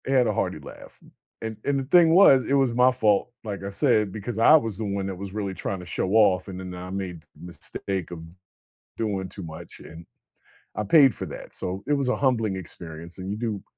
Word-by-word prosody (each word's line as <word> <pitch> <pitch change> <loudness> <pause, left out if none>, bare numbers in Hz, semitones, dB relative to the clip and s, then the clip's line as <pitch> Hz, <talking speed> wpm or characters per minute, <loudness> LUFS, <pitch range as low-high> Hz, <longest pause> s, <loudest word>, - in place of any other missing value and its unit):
I - - -1
had 130 -3 +4
a 110 - +1
hearty - - -2
laugh, - - -13
m - - -19 0.3
and 110 -1 -5
and 140 -1 +1
the - - -2
thing 165 +3 +5
was, 140 -9 +7
it - - -1
was 135 -4 +3
my 125 +1 +5
fault, 110 -2 +1
like 100 -3 -5
I 100 - -4
said, 110 -2 +1
because 110 +3 -5
I 135 +7 +7
was 115 -10 +1
the 110 - -3
one 100 -1 -2
that 95 - -4
was 95 +1 -7
really 100 -2 -3
tryna 95 -1 -5
show 90 - -2
off, 100 -4 +4
and 95 -2 -7
then 90 -1 -7
I 90 +1 -8
made 95 -4 -5
the 75 - -28 0.2
mistake 90 +1 -5
of 80 -2 -8 0.7
doing 100 -4 -2
too 95 - -9
much, 80 -2 -10
and 80 +1 -12 0.7
I 105 - -2
paid 135 +2 +6
for - - -5
that. - - -9
So, 95 +2 -5
it 145 - +2
was 140 -3 0
a - - +2
humbling 115 -7 +1
experience, 85 -2 -9
and 95 +1 -6
you 105 - -3
do 110 -3 -3
100 Hz, 230 wpm, -25 LUFS, 95-125 Hz, 0.7 s, was